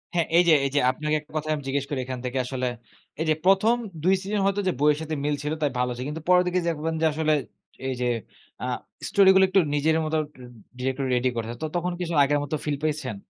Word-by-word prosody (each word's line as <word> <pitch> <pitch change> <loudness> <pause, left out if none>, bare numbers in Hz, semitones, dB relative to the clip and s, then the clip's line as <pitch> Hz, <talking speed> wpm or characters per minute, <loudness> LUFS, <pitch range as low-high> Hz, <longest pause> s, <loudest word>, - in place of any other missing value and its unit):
হ্যাঁ, 170 -2 +2
এই 175 - +7
যে - - +7
এই 135 - -1
যে - - +5
আপনাকে 150 +2 -1
একটা 150 - -20
কথা 155 0 -3
আমি 150 - -6
জিজ্ঞেস 140 0 -1
করি 140 -3 -2
এখান 130 0 -5
থেকে 125 +1 -2
আসলে। 130 0 -3 0.5
এই 160 - 0
যে - - +5
প্রথম 195 +5 +5 0.3
২ 185 +3 +4
সিজন 205 +2 -2
হয়তো 200 +1 +1
যে 185 - +3
বইয়ের 150 +1 +3
সাথে 160 0 -3
মিল 145 0 +1
ছিল 150 +1 -1
তাই 145 -3 +1
ভালো 125 0 +1
ছিল। 125 - -4
কিন্তু 155 +2 -5
পরের 180 0 +6
দিকে 180 +1 +1
দেখবেন 165 0 -1
যে 160 - +3
আসলে 155 0 +1 0.5
এই 130 - -1
যে 125 - +1 0.6
আ - - -1 0.4
স্টোরি 195 -1 +5
গুলো 190 - +6
একটু 195 - +4
নিজের 150 +2 +2
মতো 155 +1 0 0.2
ডি 130 - -12 0.4
ডিরেক্টর 130 +1 -1
রেডি 125 +1 +2
করেছে। 115 0 -3 0.2
তখন 180 +1 -1
কিছু 170 -1 -3
আগের 145 +1 +2
মতো 145 +2 -3
ফিল 145 -2 -1
পেয়েছেন 150 -7 -2
150 Hz, 235 wpm, -25 LUFS, 135-170 Hz, 0.6 s, এই